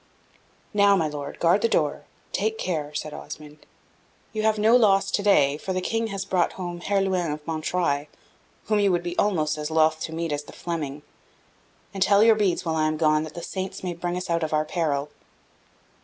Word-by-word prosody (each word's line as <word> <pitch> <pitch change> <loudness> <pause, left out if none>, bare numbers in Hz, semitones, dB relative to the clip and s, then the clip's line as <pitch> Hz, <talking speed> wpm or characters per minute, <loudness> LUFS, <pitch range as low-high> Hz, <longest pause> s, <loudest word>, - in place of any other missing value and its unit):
"Now, 200 -1 +5
my 165 -5 +1
Lord, 145 -1 -6
guard 175 +4 +3
the 230 - +2
door 150 -5 0 0.3
take 220 +2 -1
care," 155 -7 -2
said 155 0 -4
Osmond; 150 0 -10 0.7
"you 215 - -1
have 220 0 +2
no 220 +3 +5
loss 195 -4 +4
to - - +1
day, 145 -9 +4
for 190 - -3
the 185 - 0
King 225 +4 -1
has 195 -2 -4
brought 185 -3 +1
home 175 -2 -6
Herluin 190 -4 0
of 150 0 -6
Montreuil, 155 -2 -1 0.6
whom 215 -1 +2
you 200 -1 +3
would 175 -1 0
be 175 0 -4
almost 155 -7 +1
as 150 0 -3
loth 160 0 +3
to 160 - -4
meet 165 0 -3
as 145 0 -3
the - - -12
Fleming. 150 -4 -4 0.9
And 195 - -6
tell 200 +2 +5
your 225 0 +7
beads 205 -4 0
while 160 -1 0
I 155 0 +2
am 155 0 -1
gone, 155 -1 +3
that 155 - -11
the 170 - -6
Saints 190 0 -5
may 180 -1 -2
bring 175 +1 -3
us 180 - -4
out 170 0 0
of 155 -1 -2
our 155 0 +2
peril." 150 -4 -1
175 Hz, 205 wpm, -25 LUFS, 155-195 Hz, 0.9 s, your